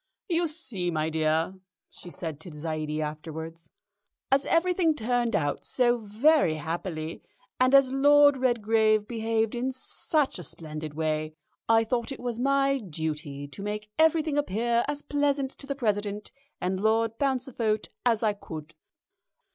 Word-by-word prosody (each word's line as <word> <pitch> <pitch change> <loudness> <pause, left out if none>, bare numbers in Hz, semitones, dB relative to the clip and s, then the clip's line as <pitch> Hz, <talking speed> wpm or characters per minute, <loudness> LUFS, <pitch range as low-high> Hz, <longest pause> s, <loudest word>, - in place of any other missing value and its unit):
"You 340 0 +2
see, 250 - -2
my 160 -1 -1
dear," 160 +2 +1 0.4
she 175 - -11
said 160 -4 -5
to 170 - -10
Zaidie 155 0 -3
afterwards, 160 +1 -7 0.6
"as 270 +1 +3
everything 335 -1 +2
turned 240 -2 0
out 145 -2 -1
so 240 -1 +3
very 225 - +3
happily, 160 +1 -4 0.4
and 255 +2 +5
as 275 -2 +6
Lord 285 +1 +6
Redgrave 220 -4 +2
behaved 225 -1 0
in 250 +2 -1
such 270 - 0
a - - -6
splendid 155 -1 -6
way, 155 0 -2 0.3
I 225 0 +5
thought 235 +3 -2
it 270 - -6
was 240 -2 -4
my 275 +1 +2
duty 150 - -5
to 195 - -10
make 210 +1 -5
everything 315 -2 +3
appear 235 -1 +1
as 290 0 -3
pleasant 285 -2 0
to 275 - -10
the 280 - -2
President 210 -4 -2 0.3
and 185 +1 -2
Lord 225 +1 +1
Pauncefote 250 -5 0
as 230 -2 +2
I 215 -2 +3
could." 160 -6 -9
220 Hz, 145 wpm, -27 LUFS, 160-270 Hz, 0.6 s, as